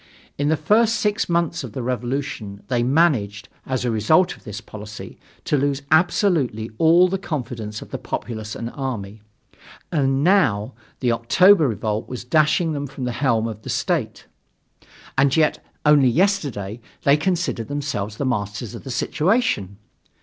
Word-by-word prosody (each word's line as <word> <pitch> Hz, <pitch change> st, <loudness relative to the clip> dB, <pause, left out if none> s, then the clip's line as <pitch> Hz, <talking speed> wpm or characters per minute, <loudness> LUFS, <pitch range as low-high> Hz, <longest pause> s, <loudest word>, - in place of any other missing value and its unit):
In 145 Hz, +1 st, 0 dB
the 160 Hz, -, +2 dB
first 220 Hz, +8 st, +3 dB
six 210 Hz, -2 st, 0 dB
months 170 Hz, -3 st, 0 dB
of 120 Hz, -5 st, -8 dB
the 130 Hz, -, -4 dB
revolution 120 Hz, -4 st, -3 dB
they 120 Hz, -2 st, +1 dB
managed, 125 Hz, -7 st, +1 dB, 0.2 s
as 130 Hz, -1 st, -1 dB
a 120 Hz, -, +1 dB
result 155 Hz, -, +3 dB
of -, -, -21 dB
this 105 Hz, -1 st, -6 dB
policy, 105 Hz, -2 st, -10 dB, 0.3 s
to -, -, +1 dB
lose 140 Hz, 0 st, 0 dB
absolutely 155 Hz, -, +2 dB
all 170 Hz, +3 st, +6 dB
the 190 Hz, +1 st, -2 dB
confidence 120 Hz, -, -5 dB
of -, -, -17 dB
the -, -, -4 dB
populace 110 Hz, -2 st, -5 dB
and 115 Hz, +1 st, -5 dB
army; 110 Hz, -7 st, -5 dB, 0.7 s
and 135 Hz, -3 st, +1 dB
now, 130 Hz, -, +2 dB, 0.3 s
the 125 Hz, -2 st, +2 dB
October 160 Hz, +9 st, +5 dB
revolt 110 Hz, -1 st, -2 dB
was 125 Hz, -2 st, -6 dB
dashing 155 Hz, +5 st, +2 dB
them 145 Hz, -1 st, -3 dB
from 135 Hz, -1 st, -8 dB
the 125 Hz, -, -1 dB
helm 115 Hz, -5 st, +2 dB
of 110 Hz, -1 st, -7 dB
the -, -, -9 dB
state. -, -, -1 dB, 0.9 s
And 140 Hz, +2 st, +3 dB
yet, 155 Hz, -1 st, +2 dB, 0.2 s
only 145 Hz, -3 st, +6 dB
yesterday 135 Hz, -, 0 dB, 0.2 s
they 140 Hz, -, +5 dB
considered 165 Hz, -, -1 dB
themselves 140 Hz, -8 st, -3 dB
the 140 Hz, -, -2 dB
masters 105 Hz, -3 st, -3 dB
of -, -, -9 dB
the 135 Hz, -, -8 dB
situation. 150 Hz, -, 0 dB
135 Hz, 155 wpm, -22 LUFS, 110-160 Hz, 0.9 s, all